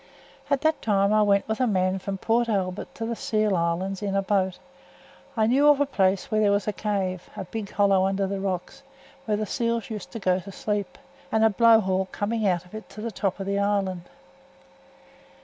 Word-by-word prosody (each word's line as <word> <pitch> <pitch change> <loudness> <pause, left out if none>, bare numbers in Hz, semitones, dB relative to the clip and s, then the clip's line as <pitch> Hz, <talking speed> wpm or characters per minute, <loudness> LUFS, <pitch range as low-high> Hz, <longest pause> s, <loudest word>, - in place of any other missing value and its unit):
At 280 -1 +1
that 315 0 +1
time 200 -1 +2
I 215 - +4
went 200 -1 +3
with 220 0 -2
a 255 - +2
man 185 -2 +1
from 195 +1 -4
Port 235 +4 +1
Albert 190 -3 -2
to 225 - -4
the 235 +1 -2
Seal 215 -3 0
Islands 175 +3 -1
in 200 -1 -2
a 195 - +1
boat. 190 -2 0 0.8
I 220 - +3
knew 270 +6 +4
of 295 -1 +6
a 285 - +3
place 195 -8 0
where 215 0 +2
there 205 -1 +4
was 200 0 0
a 210 - 0
cave, 190 -4 -2
a - - -3
big 205 +2 -6
hollow 195 -2 +3
under 195 0 0
the 195 0 -3
rocks, 185 -2 -4 0.4
where 210 -2 0
th' 215 0 -2
seals 230 +2 -2
used 210 -3 -6
to 230 - -5
go 185 -2 +1
to 195 +2 -10
sleep, 205 0 -3 0.3
and 220 0 +2
a 220 - +5
blow 230 +2 +6
hole 190 -1 0
coming 215 +1 -1
out 180 -2 0
of 180 - -20
it 215 0 -8
to 215 +3 -6
th' 225 - -6
top 195 0 -2
of 195 - -4
the 200 +1 0
island. 195 -3 -1
200 Hz, 220 wpm, -25 LUFS, 190-220 Hz, 0.8 s, of